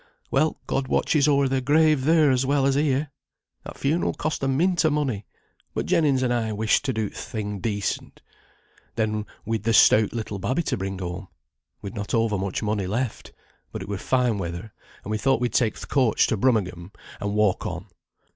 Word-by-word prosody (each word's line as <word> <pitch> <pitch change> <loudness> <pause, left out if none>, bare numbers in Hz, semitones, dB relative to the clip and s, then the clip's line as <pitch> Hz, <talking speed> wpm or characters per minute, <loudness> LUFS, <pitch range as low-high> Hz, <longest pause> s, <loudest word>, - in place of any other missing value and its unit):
Well, 155 - +1
God 135 -1 -1
watches 145 +2 +2
o'er 140 -2 +3
their 135 0 0
grave 150 0 +3
there 155 -2 +5
as 130 0 +2
well 140 0 +2
as 135 - +3
here. 145 0 +1 0.5
That - - -9
funeral 155 +5 0
cost 155 0 -2
a 135 - 0
mint 175 +7 +2
o' 160 - +4
money, 135 -9 -1 0.5
but - - -1
Jennings 140 -5 +2
and 125 -1 +1
I 110 -2 -1
wished 110 +5 +2
to 135 - +1
do 110 -3 -1
th' - - -13
thing 105 -2 -5
decent. 105 -1 -3 0.7
Then 110 -2 -1 0.2
we'd 110 -1 -1
the 115 +2 0
stout 110 -1 +6
little 110 -4 -4
babby 130 - 0
to - - -1
bring 95 0 -4
home. 90 +1 -5 0.6
We'd 100 - -6
not 105 +1 -3
overmuch 105 -3 0
money 105 -3 -1
left; 120 +4 -3 0.4
but - - -5
it - - -10
were 100 -1 -4
fine 125 -3 +1
weather, 85 +4 -5 0.3
and 105 - -6
we 110 - -1
thought 135 -1 +2
we'd 120 -3 -1
take 110 -4 +1
th' - - -8
coach 125 -6 +3
to - - 0
Brummagem, 95 -6 0 0.3
and 100 0 -2
walk 105 -3 +2
on. 90 +2 -5
115 Hz, 195 wpm, -24 LUFS, 105-135 Hz, 0.7 s, stout